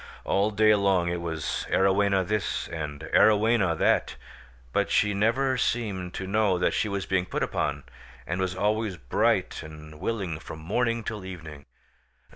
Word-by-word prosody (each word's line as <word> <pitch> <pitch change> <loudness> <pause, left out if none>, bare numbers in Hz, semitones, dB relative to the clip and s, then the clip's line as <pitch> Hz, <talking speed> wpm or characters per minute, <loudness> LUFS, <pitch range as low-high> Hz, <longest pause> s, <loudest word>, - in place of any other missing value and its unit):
All 100 +2 +1
day 110 0 +4
long 95 -4 +2
it 85 0 -2
was 80 -3 -3
Arowhena 95 0 +3
this, 105 0 -1
and 75 -3 -5
Arowhena 105 -5 +4
that; - - +2 0.6
but - - +1
she 105 0 +2
never 125 +6 +1
seemed 95 -7 -2
to 95 - -4
know 100 -1 +2
that 90 - +1
she 105 - 0
was 100 -1 -2
being 95 -1 0
put - - -2
upon, - - -2 0.4
and 90 +8 -2
was 95 -1 -1
always 105 0 0
bright 65 -5 0
and 75 -1 -11
willing 95 -8 -3
from 80 - -9
morning 115 +8 -1
till 105 -2 -5
evening. 80 -6 -9
95 Hz, 155 wpm, -27 LUFS, 85-105 Hz, 0.6 s, day